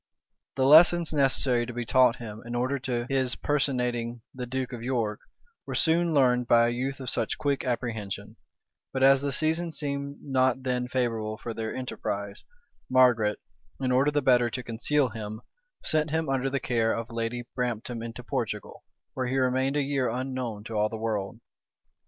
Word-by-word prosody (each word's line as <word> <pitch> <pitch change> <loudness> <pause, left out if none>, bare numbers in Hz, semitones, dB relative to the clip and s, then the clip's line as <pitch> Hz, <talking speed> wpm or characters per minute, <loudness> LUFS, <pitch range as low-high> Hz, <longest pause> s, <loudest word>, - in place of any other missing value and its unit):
The 130 0 +2
lessons 165 +3 +6
necessary 130 -4 +2
to 120 - -6
be 120 0 -3
taught 125 0 +4
him, 110 -3 -8
in 120 0 -6
order 130 +3 0
to 120 -2 -2
his 130 -2 +1
personating 125 -5 -1
the 125 -1 -6
duke 130 +1 -3
of 120 - -6
York, 115 -4 -1 0.5
were - - -4
soon 170 +1 +3
learned 125 -4 +3
by 115 -1 +5
a 120 - +1
youth 130 +3 -3
of 130 - -7
such - - -1
quick 140 -2 0
apprehension; 115 -5 -4 0.6
but 130 0 0
as 135 0 +6
the 140 0 -1
season 160 +4 0
seemed 140 -2 -4
not 130 -1 +1
then 125 -1 -1
favorable 115 -4 -1
for 115 0 -6
their 110 0 -4
enterprise, 100 -5 -4 0.4
Margaret, 120 -5 +4 0.4
in 130 -1 0
order 130 +3 +4
the 145 0 0
better 125 -2 +4
to 125 +2 -5
conceal 125 +4 +1
him, 110 0 -7 0.4
sent 155 0 +2
him, 160 -1 -1
under 135 0 0
the 140 +1 -1
care 115 -3 +1
of 115 0 -4
Lady 115 +1 -3
Brampton 120 -1 -3
into 115 0 -7
Portugal, - - -4 0.3
where 130 -1 -2
he 130 +2 -1
remained 130 +1 +1
a 145 - +2
year 135 -2 0
unknown 125 -3 -3
to 115 - -8
all 105 0 +1
the 110 - -5
world. 110 -1 -3
125 Hz, 175 wpm, -27 LUFS, 115-135 Hz, 0.6 s, lessons